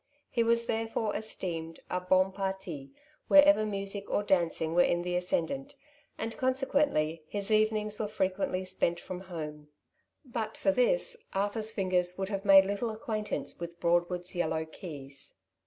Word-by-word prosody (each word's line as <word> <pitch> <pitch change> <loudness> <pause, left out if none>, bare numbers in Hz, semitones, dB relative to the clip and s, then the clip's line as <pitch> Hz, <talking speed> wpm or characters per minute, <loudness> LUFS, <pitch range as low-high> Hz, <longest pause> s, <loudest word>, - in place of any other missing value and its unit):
He 235 - +1
was 230 0 +3
therefore 225 -1 -1
esteemed 170 -6 -4
a 180 - -1
hon 185 +1 +3
jparti 190 -7 -4 0.4
wherever 290 -7 +6
music 200 0 -4
or 205 - +1
dancing 170 -4 +1
were 175 - +5
in 175 0 +2
the 180 0 -2
ascendant, 270 +11 -1 0.4
and 225 0 -4
consequently 255 - +1
his 200 +2 -2
even 215 0 +4
ings 210 0 -4
were 215 - -1
frequently 190 -2 -1
spent 175 -2 0
from 185 0 -7
home; 155 -5 -7 0.6
but 235 -3 -4
for 290 - +2
this - - +2
Arthur^s 205 +3 +1
fingers 180 -3 0
would 190 0 -3
have 200 -1 -3
made 195 -1 +8
little 205 +4 -2
acquaintance 215 -1 -3
with 170 0 -7
Broadwood^s 175 +1 +1
yellow 160 -3 -1
keys. 140 -5 -9
195 Hz, 150 wpm, -30 LUFS, 175-220 Hz, 0.6 s, made